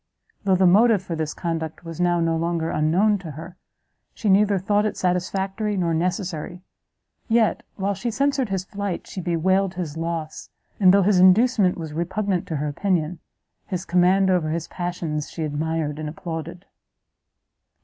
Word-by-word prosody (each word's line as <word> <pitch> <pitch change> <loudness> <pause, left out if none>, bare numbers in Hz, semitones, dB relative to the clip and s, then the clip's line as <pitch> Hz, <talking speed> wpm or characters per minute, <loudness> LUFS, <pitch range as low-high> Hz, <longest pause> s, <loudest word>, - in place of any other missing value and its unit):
Though 190 -2 +4
the 185 +1 +3
motive 205 +2 +5
for 170 -2 -4
this 155 -1 -3
conduct 165 0 -4
was 165 +1 -6
now 175 -1 +2
no 165 -1 +1
longer 165 0 -1
unknown 185 +7 +2
to 175 -3 -8
her, 160 +5 -9 0.6
she 215 - -1
neither 200 +1 +4
thought 205 +3 +1
it 215 - -2
satisfactory 195 +3 -1
nor 170 -3 0
necessary; 175 0 -3 0.6
yet, 225 -2 +2
while 200 0 -1
she 220 +5 -3
censured 275 0 0
his 190 -1 -1
flight, 200 -2 -4
she 185 - -6
bewailed 185 +3 +1
his 165 -4 -4
loss, 165 -1 -4 0.3
and 185 -3 +7
though 200 0 +5
his 190 -1 +3
inducement 190 +1 +4
was 160 -3 -6
repugnant 180 +3 -1
to 160 - -3
her 150 +1 -2
opinion, 170 +1 -1 0.5
his 185 -2 -4
command 185 +2 +3
over 175 -4 +1
his 165 +1 -3
passions 170 -4 -4
she 165 - -5
admired 155 0 -2
and 155 -1 -4
applauded. 165 +2 -6
180 Hz, 160 wpm, -23 LUFS, 165-195 Hz, 0.6 s, and